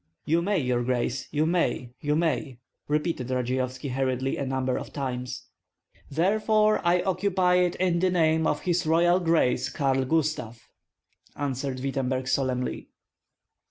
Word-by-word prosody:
"You 165 +3 +2
may, 200 +3 +1
your 125 -5 0
grace, 125 +1 -1
you 150 +1 +1
may, 160 -7 0
you 150 0 0
may," 155 -5 -1 0.3
repeated 150 -4 -1
Radzeyovski 130 +2 -2
hurriedly, 130 0 -1
a 140 - -3
number 130 -1 -1
of - - -5
times. 130 -2 -4 0.7
"Therefore 215 +6 +2
I 175 +1 +3
occupy 185 -1 +2
it 180 -1 +2
in 180 -2 +1
the 185 +1 +2
name 160 -2 +2
of - - 0
his 175 -2 0
Royal 175 +3 +4
Grace 135 -7 +2
Karl 135 -2 0
Gustav," 145 -6 -1 0.8
answered 135 -2 -3
Wittemberg, 130 -1 -2
solemnly. 130 -2 -1
145 Hz, 135 wpm, -26 LUFS, 130-170 Hz, 0.8 s, Royal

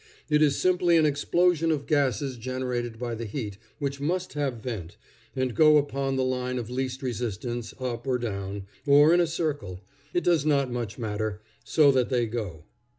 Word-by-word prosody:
It 150 0 +4
is 145 -3 +4
simply 180 -2 +3
an 160 - +4
explosion 165 +3 +2
of 145 -3 -1
gases 140 -3 +1
generated 125 -1 -3
by 120 0 -3
the 115 +1 -4
heat, 105 -3 -5 0.2
which 140 -2 -3
must 180 +5 -1
have 140 -3 -1
vent, 110 -7 -6 0.4
and 130 -2 -1
go 155 +1 +6
upon 140 -2 0
the 130 - +1
line 125 0 -1
of 120 -1 -5
least 130 +1 -3
resistance, 120 -1 -3
up, 120 -1 -4
or 130 -1 +2
down, 100 -4 -4 0.2
or 145 +3 +7
in 175 - +5
a 175 - +3
circle 145 - -3 0.3
it 175 - 0
does 170 -5 +3
not 140 -4 +2
much 115 -4 -4
matter, 110 -2 -3 0.2
so 150 -3 +5
that 130 -2 +1
they 125 -3 +2
go. 105 -9 -5
130 Hz, 180 wpm, -27 LUFS, 115-145 Hz, 0.4 s, or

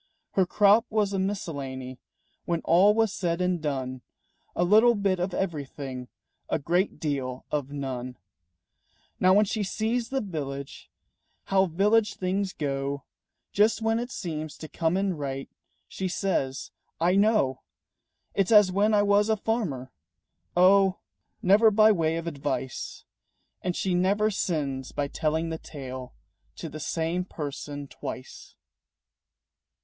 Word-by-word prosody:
Her 190 -2 +2
crop 210 +5 +4
was 210 -2 +1
a 195 - 0
miscellany 140 - -4 0.5
When 170 -1 -1
all 195 +5 +5
was 225 -3 +2
said 170 -3 -1
and 180 -2 0
done, 130 -4 -3 0.5
A 175 - +2
little 220 +6 +6
bit 195 -3 +1
of 180 +2 -1
everything, 140 -8 -4 0.4
A - - +1
great 175 +6 0
deal 135 -4 -3
of 145 -3 -1
none. 130 -3 -5 1.0
Now 185 +1 +5
when 210 +1 +5
she 215 +2 -2
sees 225 +4 -1
in - - -3
the 260 -6 -1
village 140 -3 -6 0.5
How 195 0 +2
village 210 +6 +2
things 190 +1 -1
go, 140 -2 -3 0.5
Just 220 +2 +3
when 225 +1 +2
it 245 +1 -4
seems 155 - -5
to 155 - -8
come 165 +3 0
in 195 -3 0
right, 135 -2 -4 0.4
She 190 - -3
says, 175 -8 -2 0.3
"I 175 +3 +3
know! 200 - +3 0.7
It's 195 +2 +1
as 210 -4 +7
when 210 +3 +3
I 205 - +4
was 205 +1 +3
a 220 - +3
farmer 185 - -2 0.3
" - - -56 0.2
Oh, 190 +1 +5 0.5
never 205 +4 +6
by 215 +1 +6
way 165 -4 +1
of 165 - -4
advice! 140 -4 -4 0.6
And 180 -1 -2
she 190 - 0
never 200 +4 +2
sins 140 -9 -2
by 145 -1 -2
telling 160 +2 -1
the 160 0 -4
tale 130 -4 -8 0.4
To - - -6
the 155 - -8
same 165 +4 -1
person 145 -3 -6
twice. 130 - -8
175 Hz, 145 wpm, -27 LUFS, 140-200 Hz, 1.0 s, as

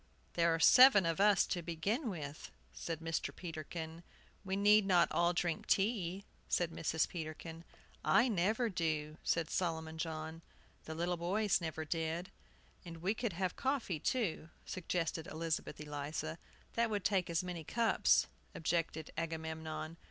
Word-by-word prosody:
"There 170 -1 +3
are - - -3
seven 230 +1 +8
of 165 +1 0
us, 205 -2 +5
to 175 - -2
begin 195 - -1
with," 150 -6 -6 0.2
said 165 - -5
Mr. 165 0 -1
Peterkin. 160 -1 -6 0.4
"We 190 -1 -2
need 205 0 +5
not 175 -4 +4
all 170 0 +3
drink 170 -2 -1
tea," 195 -2 +1 0.2
said 175 -2 +1
Mrs. 160 -1 0
Peterkin. 165 0 -7 0.4
"I 245 - +5
never 215 +3 +1
do," 155 -5 -2
said 165 -1 0
Solomon 160 -2 -2
John. 160 0 -4 0.4
The 160 - -5
little 175 +2 -1
boys 190 +3 +1
never 160 -1 -3
did. 165 +3 -2 0.5
"And 170 -2 -8
we 185 +5 0
could 230 -3 -2
have 180 +1 -1
coffee, 260 - -1
too," 185 - -1 0.2
suggested 165 -2 -2
Elizabeth 160 -1 -3
Eliza. 150 +2 -4 0.3
"That 235 0 +1
would 205 -3 -1
take 190 -3 +2
as 170 +1 0
many 175 -3 -5
cups," 230 +7 +3 0.3
objected 165 -1 -1
Agamemnon. 160 0 -4
170 Hz, 145 wpm, -35 LUFS, 160-190 Hz, 0.5 s, seven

